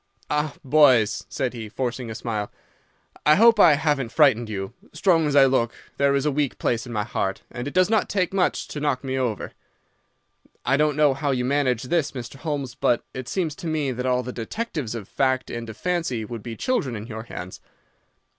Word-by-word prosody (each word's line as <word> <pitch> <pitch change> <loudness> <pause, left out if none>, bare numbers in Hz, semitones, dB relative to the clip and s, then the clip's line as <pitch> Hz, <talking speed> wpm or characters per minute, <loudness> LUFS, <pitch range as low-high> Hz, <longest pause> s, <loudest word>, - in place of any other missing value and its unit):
"'Ah, 150 0 0
boys,' 130 -6 +4
said 130 -2 -2
he, 110 -3 -7
forcing 125 +1 -3
a 110 - -5
smile, 110 -3 -3 0.7
'I 150 - +6
hope 230 +2 +6
I 165 - +8
haven't 145 -5 0
frightened 125 -7 +4
you. 95 -2 -4 0.2
Strong 165 -1 +3
as 145 - 0
I 140 -1 +8
look, 125 -3 +1 0.2
there 140 0 +3
is 140 +1 0
a 150 - +2
weak 145 -1 -1
place 115 0 -1
in - - -7
my 105 -3 -1
heart, 95 -3 -3
and 120 +2 -5
it 145 - -5
does 185 0 +5
not 220 0 +1
take 190 -2 0
much 190 -2 +1
to 150 - -5
knock 145 -3 -1
me 130 -1 -2
over. 125 -6 -2 1.1
I 135 +3 +3
don't 150 0 +2
know 150 -2 +5
how 145 +2 -2
you 125 -2 0
manage 130 -3 +1
this, 150 +2 0
Mr. 125 0 -7
Holmes, 145 -4 -3
but 120 - +1
it 130 -1 -6
seems 170 -5 -1
to 175 - -6
me 155 -4 0
that 125 +1 -3
all 125 0 +1
the 125 +1 -6
detectives 140 - -4
of 105 -4 -6
fact 130 -1 0
and 115 -1 -5
of 110 - -9
fancy 165 -11 -1
would 115 0 -7
be 115 +1 -6
children 140 - -1
in 105 0 -6
your 110 -1 -7
hands. 90 -5 -8
130 Hz, 210 wpm, -24 LUFS, 120-150 Hz, 1.1 s, I